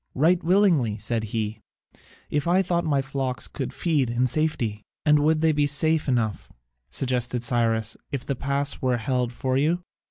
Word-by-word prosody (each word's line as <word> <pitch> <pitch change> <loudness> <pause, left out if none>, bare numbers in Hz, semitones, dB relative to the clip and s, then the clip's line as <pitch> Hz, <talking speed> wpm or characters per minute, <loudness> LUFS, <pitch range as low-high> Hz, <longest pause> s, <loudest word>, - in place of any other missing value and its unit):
"Right 170 +6 +3
willingly," 165 - +3
said 110 +1 -1
he, 110 0 -3 0.7
"if 150 +1 0
I 185 +3 +4
thought 175 -1 0
my 145 -4 +1
flocks 135 -2 -3
could 135 -4 -5
feed 150 -8 0
in 120 +2 +1
safety." 125 -6 -1 0.2
"And 150 -1 +5
would 155 +1 +2
they 160 0 +4
not 150 - -4
be 145 0 +3
safe 155 +2 +2
enough," 115 -5 -1 0.4
suggested 125 -2 -1
Cyrus, 115 -2 +1 0.2
"if 135 -3 -4
this 140 - -2
pass 140 0 -1
were 125 -2 +1
held 125 +1 -1
for 130 +1 -1
you?" 165 +6 +1
135 Hz, 170 wpm, -25 LUFS, 120-155 Hz, 0.7 s, And